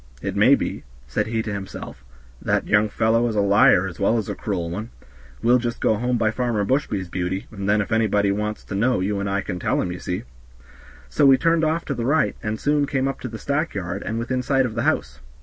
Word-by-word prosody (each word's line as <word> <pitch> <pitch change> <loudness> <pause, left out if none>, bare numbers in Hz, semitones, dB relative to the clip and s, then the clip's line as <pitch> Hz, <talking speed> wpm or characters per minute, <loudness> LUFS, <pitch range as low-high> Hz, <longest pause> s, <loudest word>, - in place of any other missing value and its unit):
"It - - -4
may - - +6
be," - - -4 0.2
said - - -2
he 110 0 -1
to 110 - -4
himself, 95 -8 -7 0.4
"that - - 0
young 105 +1 +3
fellow 115 +2 +2
is 110 - -2
a - - +2
liar 100 -2 +5
as 90 -3 -7
well 105 +4 +2
as 110 - -3
a - - -1
cruel 90 -5 -3
one; 105 +6 -5 0.5
we'll 120 +2 +5
just 120 -1 -3
go - - +2
home 120 +3 0
by 110 -2 +1
Farmer 115 -4 -1
Bushby's, 100 -6 -1
Beauty, 90 +2 -3
and 100 -2 -4
then 105 +1 +3
if 100 - -5
anybody 105 -3 +2
wants 105 +1 -3
to - - -8
know 115 +5 +2
you 100 +2 -1
and 100 0 -2
I 100 +1 0
can 90 -2 -5
tell - - 0
'em, 90 - -1
ye 90 - -6
see." 90 +3 -4 0.8
So 65 - +3
we 135 -1 +7
turned 165 +2 +2
off 160 +2 0
to 140 - -2
the 120 -3 -3
right, 155 +4 +2
and 110 0 -3
soon 145 0 +1
came 135 -1 0
up 135 - -3
to - - -5
the 115 -2 -7
stack 140 +5 -2
yard, 100 +1 -3
and 110 - -3
within 125 +2 -1
sight 135 0 +2
of 120 - -3
the 120 - -2
house. 65 +1 -3
110 Hz, 245 wpm, -23 LUFS, 100-125 Hz, 0.8 s, we